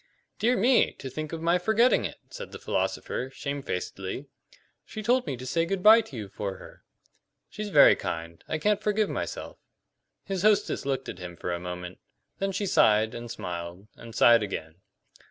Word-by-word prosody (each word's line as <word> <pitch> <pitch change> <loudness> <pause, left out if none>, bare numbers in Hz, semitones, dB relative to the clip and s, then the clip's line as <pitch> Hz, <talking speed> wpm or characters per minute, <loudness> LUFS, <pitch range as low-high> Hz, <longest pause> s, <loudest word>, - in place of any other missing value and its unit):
"Dear 240 +3 +2
me! 240 +5 +4
To 130 - -8
think 155 +3 -5
of 165 -1 -5
my 170 +2 +3
forgetting 220 +7 +3
it!" - - -5
said - - -8
the - - -7
philosopher, 130 - -2
shamefacedly. 135 -5 -4 0.6
"She 215 - -7
told 245 +3 +2
me 130 - -3
to 130 - -8
say 165 +6 +1
good 185 +2 -2
bye 220 +2 +9
to 140 - -12
you 105 -3 -5
for 100 0 -5
her." - - -14 0.7
"She's 210 +1 -5
very 150 -7 +7
kind. 85 0 -5
I 160 - -1
can't 210 +5 +1
forgive 210 0 +1
myself." - - -5 0.6
His 195 -2 -3
hostess 210 -7 +2
looked 135 -1 -1
at 90 - -7
him 90 -1 -7
for 90 - -3
a 85 - -3
moment; 90 0 -7 0.4
then 195 0 0
she 200 +2 -2
sighed, 110 - +4
and 120 0 -7
smiled, 90 0 -6
and 115 -1 -11
sighed 120 -1 +6
again. 80 -5 -5
140 Hz, 180 wpm, -27 LUFS, -, 0.7 s, bye